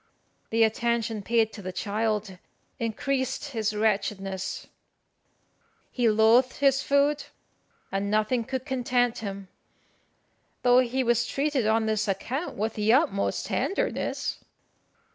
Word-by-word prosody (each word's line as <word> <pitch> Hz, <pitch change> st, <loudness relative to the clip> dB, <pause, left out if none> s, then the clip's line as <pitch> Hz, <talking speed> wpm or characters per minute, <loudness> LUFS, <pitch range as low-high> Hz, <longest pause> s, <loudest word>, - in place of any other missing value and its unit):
The 225 Hz, 0 st, +3 dB
attention 225 Hz, -1 st, 0 dB
paid 225 Hz, +1 st, +1 dB
to 205 Hz, -, -8 dB
the 185 Hz, -1 st, -5 dB
child 210 Hz, 0 st, -2 dB, 0.4 s
increased 260 Hz, +4 st, -2 dB
his 220 Hz, -5 st, -2 dB
wretchedness; 195 Hz, -3 st, -1 dB, 1.3 s
he 245 Hz, -3 st, +2 dB
loathed 225 Hz, +4 st, +4 dB
his 275 Hz, -1 st, +3 dB
food, 285 Hz, +1 st, +2 dB, 0.7 s
and 195 Hz, +1 st, -1 dB
nothing 215 Hz, +3 st, +1 dB
could 260 Hz, +2 st, -4 dB
content 250 Hz, -3 st, 0 dB
him, 195 Hz, -2 st, -6 dB, 1.2 s
though 245 Hz, 0 st, +6 dB
he 255 Hz, +1 st, +1 dB
was 240 Hz, 0 st, +2 dB
treated 275 Hz, -5 st, 0 dB
on 220 Hz, 0 st, +2 dB
this 215 Hz, -1 st, 0 dB
account 250 Hz, -, -3 dB
with 220 Hz, +2 st, -1 dB
the 215 Hz, +1 st, +1 dB
utmost 255 Hz, -6 st, +1 dB
tenderness. -, -, -2 dB
225 Hz, 115 wpm, -27 LUFS, 210-255 Hz, 1.3 s, though